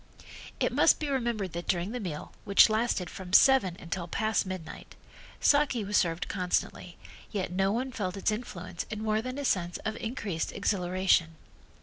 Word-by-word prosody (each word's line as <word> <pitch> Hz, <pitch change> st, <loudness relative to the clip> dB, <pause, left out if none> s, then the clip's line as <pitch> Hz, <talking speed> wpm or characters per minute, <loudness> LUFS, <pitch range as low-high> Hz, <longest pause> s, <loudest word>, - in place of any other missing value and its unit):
It -, -, +1 dB
must -, -, +5 dB
be 300 Hz, -, -3 dB
remembered 235 Hz, -, -1 dB
that 170 Hz, 0 st, -5 dB
during 175 Hz, +3 st, 0 dB
the 250 Hz, -, -4 dB
meal, 170 Hz, -8 st, -6 dB
which 200 Hz, +2 st, +6 dB
lasted 215 Hz, -5 st, 0 dB
from 185 Hz, +1 st, -9 dB
seven 210 Hz, -8 st, +5 dB
until 175 Hz, 0 st, -4 dB
past 215 Hz, +2 st, 0 dB
midnight, 185 Hz, -4 st, -8 dB, 0.4 s
saki 285 Hz, -6 st, +3 dB
was 205 Hz, +1 st, -3 dB
served 170 Hz, -1 st, +1 dB
constantly 180 Hz, -1 st, -2 dB, 0.3 s
yet 190 Hz, -4 st, -2 dB
no 195 Hz, +2 st, +1 dB
one 255 Hz, +4 st, -2 dB
felt 200 Hz, -5 st, -3 dB
its 195 Hz, -, +1 dB
influence 185 Hz, -6 st, -5 dB
in 215 Hz, 0 st, -5 dB
more 215 Hz, 0 st, +1 dB
than 255 Hz, +3 st, -5 dB
a 285 Hz, -, -3 dB
sense 175 Hz, -6 st, 0 dB
of 220 Hz, 0 st, -2 dB
increased 205 Hz, -8 st, -3 dB
exhilaration. 185 Hz, -4 st, +1 dB
195 Hz, 165 wpm, -29 LUFS, 180-225 Hz, 0.4 s, which